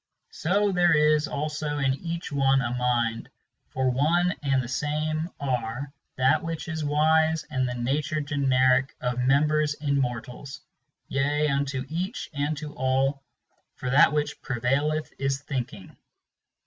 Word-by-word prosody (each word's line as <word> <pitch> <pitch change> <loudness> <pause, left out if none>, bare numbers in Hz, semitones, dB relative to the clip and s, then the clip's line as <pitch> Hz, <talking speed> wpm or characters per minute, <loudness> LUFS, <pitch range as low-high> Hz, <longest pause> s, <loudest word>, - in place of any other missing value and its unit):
So 200 +5 +1
there 175 -3 +4
is 150 0 +3
also 150 0 -3
in 135 -2 +2
each 170 +4 -5
one 135 -1 +3
a 125 -2 -1
mind; 120 -2 0 0.4
for 130 -1 0
one 170 +7 +2
and 135 -2 +1
the - - -6
same 155 +4 -2
are 130 0 -3 0.2
That 130 +4 +3
which 165 0 -5
is 160 -2 -3
wise 160 +2 +2
and 130 -1 0
the 125 - -4
nature 145 +6 -1
generic 135 -2 +2
of 125 0 -2
members 145 +3 +2
in 140 -2 0
mortals, 125 +2 -5 0.5
Yea, 145 +2 +1
unto 140 -1 -1
each 180 - -4
and 145 +1 -1
to 150 0 -7
all; 135 +2 0 0.5
for 125 - -4
that 145 +3 +6
which 150 0 -2
prevaileth 140 +5 -1
is 135 0 -1
thinking. 125 -9 -5
140 Hz, 140 wpm, -26 LUFS, 130-155 Hz, 0.5 s, that